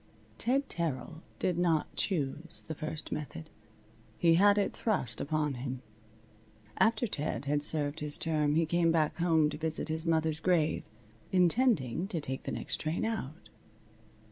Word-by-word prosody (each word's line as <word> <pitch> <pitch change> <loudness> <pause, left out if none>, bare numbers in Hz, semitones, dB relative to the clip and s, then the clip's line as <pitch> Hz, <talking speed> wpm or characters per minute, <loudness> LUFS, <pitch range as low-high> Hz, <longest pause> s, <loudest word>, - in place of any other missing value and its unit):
Ted 270 +4 +1
Terrill 160 0 -3 0.2
did 180 -2 0
not 165 -3 +1
choose 165 -2 -2
the 160 - -3
first 155 0 -5
method. 155 +1 -6 0.7
He 170 -1 +4
had 200 +4 +5
it 200 - +1
thrust 130 - -1
upon 150 -1 0
him. 130 0 -5 1.0
After 225 +1 +3
Ted 145 - -3
had 145 +1 +1
served 150 0 +1
his 150 -1 +1
term 150 -2 +1
he 165 +1 +3
came 170 +1 +2
back 160 -2 +1
home 165 -3 +3
to 150 - -6
visit 160 0 -2
his 160 +1 0
mother's 160 -1 +1
grave, 165 -3 +2 0.5
intending 180 - +2
to 175 -5 -2
take 135 -3 -5
the - - -3
next - - -2
train 155 +6 -2
out. 190 -8 -4
160 Hz, 150 wpm, -31 LUFS, 150-175 Hz, 1.0 s, had